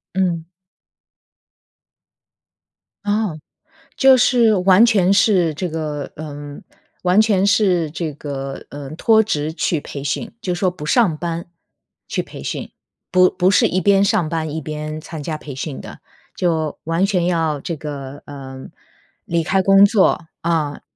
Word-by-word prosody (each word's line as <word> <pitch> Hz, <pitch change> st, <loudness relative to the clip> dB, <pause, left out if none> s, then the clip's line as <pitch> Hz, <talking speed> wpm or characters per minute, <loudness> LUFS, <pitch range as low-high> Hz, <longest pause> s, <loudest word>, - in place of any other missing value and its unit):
嗯。 175 Hz, -3 st, -1 dB, 2.6 s
哦， 205 Hz, -5 st, -1 dB, 0.6 s
就 265 Hz, -1 st, +6 dB
是 240 Hz, -3 st, +4 dB
完 190 Hz, +3 st, +5 dB
全 195 Hz, -6 st, +3 dB
是 190 Hz, -5 st, +3 dB
这 180 Hz, +4 st, -2 dB
个 155 Hz, -3 st, -4 dB
嗯， 145 Hz, -1 st, -8 dB, 0.4 s
完 180 Hz, +2 st, +4 dB
全 200 Hz, -3 st, +2 dB
是 185 Hz, -5 st, +2 dB
这 155 Hz, 0 st, -4 dB
个， 140 Hz, -2 st, -6 dB
嗯， 145 Hz, +1 st, -8 dB
脱 220 Hz, +5 st, +4 dB
职 155 Hz, -7 st, -2 dB
去 160 Hz, -2 st, -1 dB
培 140 Hz, -, -7 dB
训， 150 Hz, +9 st, -3 dB
就 185 Hz, -5 st, -2 dB
说 180 Hz, +1 st, +1 dB
不 175 Hz, -4 st, -8 dB
上 185 Hz, -2 st, +2 dB
班， 170 Hz, +1 st, -4 dB, 0.6 s
去 -, -, -1 dB
培 -, -, -10 dB
训。 -, -, -5 dB, 0.4 s
不 185 Hz, 0 st, +5 dB
不 180 Hz, 0 st, +1 dB
是 190 Hz, -, +4 dB
一 185 Hz, -, 0 dB
边 195 Hz, +2 st, +4 dB
上 200 Hz, -4 st, +1 dB
班 160 Hz, -2 st, -3 dB
一 160 Hz, -, -2 dB
边 155 Hz, +1 st, -5 dB
参 155 Hz, -1 st, -8 dB
加 155 Hz, +1 st, -3 dB
培 145 Hz, -3 st, -9 dB
训 135 Hz, +1 st, -5 dB
的， -, -, -11 dB, 0.4 s
就 160 Hz, -4 st, -1 dB
完 165 Hz, +4 st, +1 dB
全 185 Hz, -4 st, 0 dB
要 165 Hz, -4 st, 0 dB
这 170 Hz, -, -4 dB
个， 140 Hz, -2 st, -7 dB
嗯， 135 Hz, -2 st, -9 dB, 0.6 s
离 170 Hz, -1 st, 0 dB
开 190 Hz, +4 st, +2 dB
工 195 Hz, +1 st, +6 dB
作， 200 Hz, -4 st, +2 dB, 0.2 s
啊。 160 Hz, -4 st, -1 dB
170 Hz, 155 characters per minute, -19 LUFS, 150-195 Hz, 2.6 s, 就